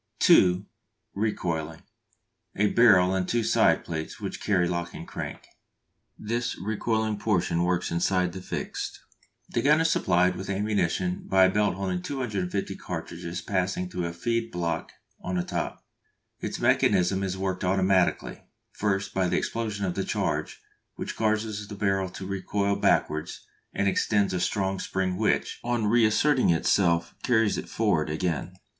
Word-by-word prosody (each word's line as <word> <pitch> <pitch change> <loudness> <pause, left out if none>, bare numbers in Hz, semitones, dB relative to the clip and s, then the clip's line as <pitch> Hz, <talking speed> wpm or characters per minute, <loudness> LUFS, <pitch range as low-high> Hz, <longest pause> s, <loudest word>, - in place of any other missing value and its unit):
(2) 90 +2 +5 0.5
Recoiling: 85 -6 -2 0.7
a 105 +1 +2
barrel 95 -6 +5
and 95 -1 -1
two 120 -1 +1
side - - +3
plates 80 -1 -5
which - - -5
carry 90 -4 +2
lock 85 0 -3
and - - -8
crank. - - -6 0.7
This 115 +3 -2
recoiling 110 +1 -1
portion 90 -5 +1
works 90 0 0
inside 90 +1 +1
the 95 - -7
fixed. - - -5 0.5
The 120 - 0
gun 150 +5 +4
is 165 0 +2
supplied 90 +1 +2
with 95 +1 -6
ammunition 95 -3 -1
by 95 0 +5
a 95 - +3
belt 105 -1 +1
holding 95 -2 -2
250 100 -7 -3
cartridges 85 +1 -6
passing 90 -1 -1
through 90 -1 -2
a - - -4
feed 115 +7 -2
block 85 -2 -2 0.3
on 90 - -3
the 90 - 0
top. - - -4 0.5
Its - - -4
mechanism 95 +2 +3
is 95 -1 -2
worked 95 0 -2
automatically; 95 0 +1 0.3
first 100 -2 -1
by 95 -1 +1
the - - +1
explosion 110 -3 -2
of 90 - -1
the - - -2
charge, - - -2 0.3
which - - -5
causes 110 -1 -1
the 105 - -7
barrel 95 -2 0
to 95 - -8
recoil 100 +1 -1
backwards 80 -3 0 0.3
and 100 - 0
extends 100 0 +1
a 90 - 0
strong 95 +1 -1
spring 95 -1 -1
which, - - 0
on 120 -2 0
reasserting 120 +5 +3
itself, 85 0 +2
carries 110 -4 +3
it - - -8
forwards 85 -9 +1
again. 85 +2 -2
95 Hz, 150 wpm, -27 LUFS, 90-105 Hz, 0.7 s, 2